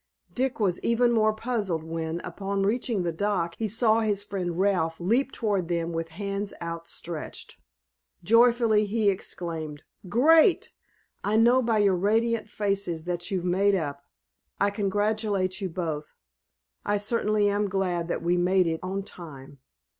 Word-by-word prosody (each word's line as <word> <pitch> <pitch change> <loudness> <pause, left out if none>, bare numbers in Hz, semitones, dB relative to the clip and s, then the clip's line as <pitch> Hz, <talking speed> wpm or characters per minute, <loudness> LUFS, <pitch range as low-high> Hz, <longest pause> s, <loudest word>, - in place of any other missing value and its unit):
Dick 260 0 -1
was 190 -5 +1
even 240 +1 +2
more 215 -2 +3
puzzled 215 -7 -2
when, 165 +1 -4
upon 195 +2 -3
reaching 220 -1 0
the 170 - -1
dock, 170 -1 -1
he 225 - 0
saw 225 +1 +2
his 205 -3 0
friend 185 -4 -4
Ralph 180 -5 +1
leap 235 +10 +1
toward 200 -6 -1
them 170 -1 -1
with 165 0 -2
hands 200 +4 -4
outstretched. 170 -1 -7 0.7
Joyfully 230 0 +4
he 210 -1 +2
exclaimed: 160 -5 -5 0.3
"Great. 315 - +4 0.5
I 210 +2 +1
know 240 +3 +5
by 230 -2 +1
your 200 -3 +4
radiant 220 +4 +1
faces 195 -6 -2
that 175 0 -3
you've 185 -3 -2
made 195 +3 +3
up. 145 -5 -3 0.6
I 200 0 +2
congratulate 205 -1 0
you 190 - -2
both. 160 -3 -4 0.7
I 205 - +1
certainly 210 0 +1
am 205 0 0
glad 180 -3 -1
that 170 - -3
we 175 +1 +2
made 180 +1 +3
it 160 -1 -1
on 195 +2 -3
time." 140 -7 -11
195 Hz, 145 wpm, -26 LUFS, 170-215 Hz, 0.7 s, know